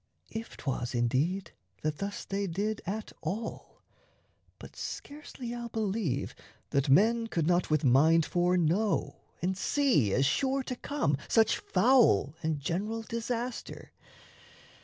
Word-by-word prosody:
(If 225 Hz, +1 st, -6 dB
'twas, 125 Hz, -2 st, -3 dB
indeed, 135 Hz, +11 st, 0 dB, 0.3 s
that 155 Hz, -1 st, -1 dB
thus 200 Hz, 0 st, -4 dB
they 195 Hz, 0 st, -2 dB
did 205 Hz, +5 st, -2 dB
at 215 Hz, +3 st, -4 dB
all: 200 Hz, +8 st, -5 dB, 0.7 s
But -, -, -12 dB
scarcely 280 Hz, -4 st, -7 dB
I'll 240 Hz, -1 st, -5 dB
believe 200 Hz, -, -1 dB, 0.4 s
that 140 Hz, 0 st, +1 dB
men 225 Hz, +10 st, +4 dB
could 165 Hz, -8 st, -1 dB
not 175 Hz, +1 st, +2 dB
With 155 Hz, -1 st, +2 dB
mind 155 Hz, +5 st, +5 dB
foreknow 180 Hz, +3 st, +1 dB, 0.3 s
and 190 Hz, +1 st, +1 dB
see, 210 Hz, -, +2 dB
as 135 Hz, +7 st, +2 dB
sure 265 Hz, -, +1 dB
to 255 Hz, -, -4 dB
come, 265 Hz, -, -1 dB
Such 225 Hz, -1 st, +4 dB
foul 230 Hz, -, +4 dB
and 155 Hz, -2 st, -1 dB
general 205 Hz, +10 st, -2 dB
disaster. 230 Hz, +2 st, -4 dB
195 Hz, 125 wpm, -30 LUFS, 155-230 Hz, 0.7 s, mind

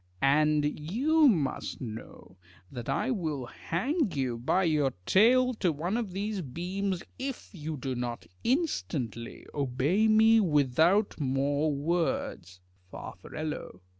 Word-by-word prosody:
And 150 Hz, +1 st, +3 dB
you 280 Hz, -, +3 dB
must 155 Hz, -, -1 dB
know 110 Hz, -5 st, -9 dB, 0.4 s
that 120 Hz, -3 st, -6 dB
I -, -, 0 dB
will 155 Hz, -, -2 dB
hang 245 Hz, -, -1 dB
you 130 Hz, -4 st, -1 dB
by 165 Hz, +9 st, +2 dB
the 150 Hz, -5 st, +1 dB
tail 250 Hz, +5 st, +5 dB
to 190 Hz, -6 st, +1 dB
one 170 Hz, +7 st, -2 dB
of 235 Hz, -4 st, -1 dB
these 200 Hz, +1 st, -3 dB
beams 180 Hz, +6 st, -3 dB, 0.2 s
if 265 Hz, -1 st, -5 dB
you 155 Hz, -3 st, -5 dB
do 130 Hz, 0 st, -3 dB
not 120 Hz, -1 st, -4 dB, 0.2 s
instantly 155 Hz, -, -2 dB
obey 145 Hz, -, +1 dB
me 220 Hz, +1 st, +6 dB
without 165 Hz, -, +3 dB
more 140 Hz, +2 st, +1 dB
words. 140 Hz, -, -2 dB, 0.3 s
Far. -, -, -8 dB
160 Hz, 120 wpm, -29 LUFS, 135-210 Hz, 0.4 s, me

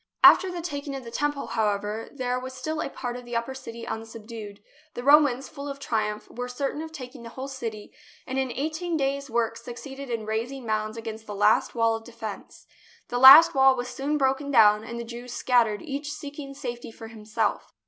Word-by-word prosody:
After 380 Hz, -, +8 dB
the 350 Hz, -2 st, -5 dB
taking 285 Hz, -3 st, -4 dB
of 270 Hz, -, -6 dB
the 230 Hz, -, -9 dB
Temple, 290 Hz, +3 st, -1 dB
however, 210 Hz, +1 st, -1 dB
there 250 Hz, -2 st, -2 dB
was 260 Hz, +1 st, -7 dB
still 310 Hz, +4 st, -3 dB
a -, -, -3 dB
part 245 Hz, -2 st, -5 dB
of 250 Hz, -, -7 dB
the 240 Hz, 0 st, -7 dB
upper 235 Hz, +3 st, -1 dB
city 235 Hz, -3 st, -8 dB
unsubdued. 220 Hz, -2 st, -7 dB, 0.4 s
The 245 Hz, -, -5 dB
Romans, 280 Hz, -2 st, +5 dB
full 280 Hz, -1 st, -8 dB
of 280 Hz, -, -5 dB
triumph, 215 Hz, -5 st, -2 dB
were 245 Hz, +1 st, -5 dB
certain 275 Hz, +4 st, -3 dB
of 320 Hz, 0 st, -7 dB
taking 255 Hz, -4 st, -9 dB
the 230 Hz, -, -9 dB
whole 260 Hz, +3 st, -6 dB
city, 230 Hz, -6 st, -6 dB, 0.3 s
and 260 Hz, 0 st, -2 dB
in 260 Hz, -2 st, -1 dB
eighteen 315 Hz, +5 st, -2 dB
days' 275 Hz, 0 st, -1 dB
work 230 Hz, -1 st, 0 dB
suc 235 Hz, +1 st, -8 dB
ceeded 270 Hz, +1 st, -8 dB
in 230 Hz, -2 st, -3 dB
raising 235 Hz, +4 st, -3 dB
mounds 215 Hz, 0 st, -2 dB
against 225 Hz, -1 st, -7 dB
the 205 Hz, -, -5 dB
last 210 Hz, +4 st, +3 dB
wall 230 Hz, -1 st, +3 dB
of 225 Hz, -, -7 dB
defence. 225 Hz, -3 st, -8 dB, 0.4 s
The 245 Hz, -, -1 dB
last 300 Hz, +6 st, +11 dB
wall 265 Hz, -1 st, +6 dB
was 245 Hz, 0 st, -4 dB
soon 285 Hz, +4 st, -1 dB
broken 270 Hz, +1 st, +1 dB
down, 215 Hz, -5 st, +6 dB
and 235 Hz, +1 st, -6 dB
the -, -, -4 dB
Jews 240 Hz, +1 st, -8 dB
scattered, 235 Hz, -5 st, +2 dB
each 290 Hz, -1 st, -4 dB
seeking 285 Hz, -2 st, -8 dB
safety 245 Hz, -4 st, -6 dB
for 225 Hz, 0 st, -10 dB
himself. 215 Hz, -1 st, -2 dB
245 Hz, 205 wpm, -26 LUFS, 225-275 Hz, 0.4 s, last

